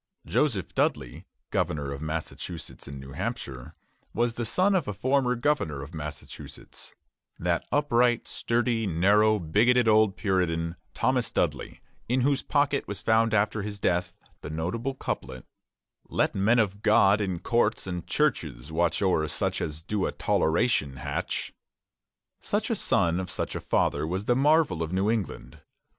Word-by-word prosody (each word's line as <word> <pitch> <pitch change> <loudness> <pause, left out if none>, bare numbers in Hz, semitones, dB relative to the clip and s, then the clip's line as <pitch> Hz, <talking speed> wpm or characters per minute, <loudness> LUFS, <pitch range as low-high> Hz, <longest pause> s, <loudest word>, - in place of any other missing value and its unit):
Joseph - - 0
Dudley, - - -1 0.2
governor 70 -2 -1
of 70 - -7
Massachusetts 80 +1 -6
and 70 -1 -7
New 65 0 -10
Hampshire, 65 +2 -5 0.4
was 120 0 +1
the 120 0 -3
son 190 - +2
of 175 -8 +1
a 105 - -3
former 130 +1 +1
governor 120 - 0
of 75 +4 -11
Massachusetts, 75 -1 -9 0.4
that 85 -1 -1
upright, 125 -5 +2
sturdy, 115 -2 0
narrow, 105 +5 +4
bigoted 115 +8 +3
old 110 -2 +4
Puritan, 85 -4 0 0.2
Thomas - - +1
Dudley, - - -2 0.3
in 125 +1 +2
whose 140 +1 +2
pocket 145 -1 +1
was 100 -1 -5
found 110 0 +3
after 105 +1 +1
his 105 0 -5
death 90 -2 0 0.3
the - - -7
notable 95 - -3
couplet, 65 - -5 0.6
"Let - - +1
men 105 +5 +3
of 100 -3 +1
God 105 -1 +4
in 95 -3 -1
courts 115 +3 +1
and 90 -2 -5
churches 80 - -1
watch 85 +4 +1
O'er 85 -5 +2
such - - -1
as 75 +1 -4
do 105 +2 -1
a - - -2
toleration 80 - +1
hatch." 70 +2 -3 0.9
Such - - -2
a - - +2
son 85 +1 +1
of 95 -1 -4
such - - -3
a - - -4
father 80 - +1
was 95 +4 -3
the 120 - +3
marvel 145 - +3
of 80 0 -2
New 95 +3 +1
England. 95 - -4
100 Hz, 150 wpm, -27 LUFS, 80-120 Hz, 0.9 s, narrow